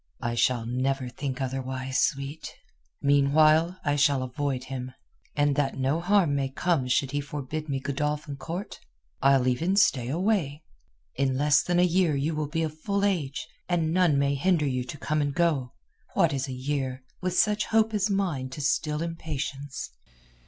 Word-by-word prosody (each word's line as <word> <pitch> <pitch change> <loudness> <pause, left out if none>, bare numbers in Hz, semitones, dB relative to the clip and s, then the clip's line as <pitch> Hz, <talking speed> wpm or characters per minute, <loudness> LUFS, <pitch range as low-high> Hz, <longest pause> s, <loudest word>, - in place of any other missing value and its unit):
"I 120 -2 -1
shall 120 0 +1
never 130 +2 -1
think 130 +1 -4
otherwise, 130 0 -2
sweet. 140 +3 -2 0.5
Meanwhile 155 +5 +4
I 145 -1 +2
shall 140 -2 +3
avoid 130 0 -2
him, 130 -1 -6 0.4
and 145 -1 +2
that 140 -2 0
no 135 +4 +1
harm 180 -4 +3
may 135 -1 0
come 135 -1 0
should 130 +1 +1
he 145 0 -1
forbid 145 +2 -5
me 135 -1 -1
Godolphin 145 +2 -2
Court 165 +8 -6 0.4
I'll 135 -1 +4
even 165 +10 +1
stay 135 -11 +3
away. 165 -3 0 0.5
In 135 -1 0
less 145 +1 +4
than 175 -1 0
a 175 - +5
year 180 -3 +2
you 145 +4 0
will 150 -1 -2
be 165 +1 -1
of 155 0 -4
full 200 +2 0
age, 155 -9 -1 0.2
and 165 -2 +1
none 175 -5 +3
may 140 0 +2
hinder 160 +2 +2
you 130 -2 -1
to 135 - -7
come 155 +1 -1
and 145 -1 -1
go. 150 -8 +1 0.4
What - - +3
is 135 0 -2
a - - -5
year, 130 0 -3 0.2
with 185 -1 -1
such 210 0 +3
hope 225 0 +2
as 210 0 +1
mine 175 -10 -1
to 140 +3 -7
still 150 +1 0
impatience?" 145 - -5
145 Hz, 175 wpm, -27 LUFS, 135-165 Hz, 0.5 s, a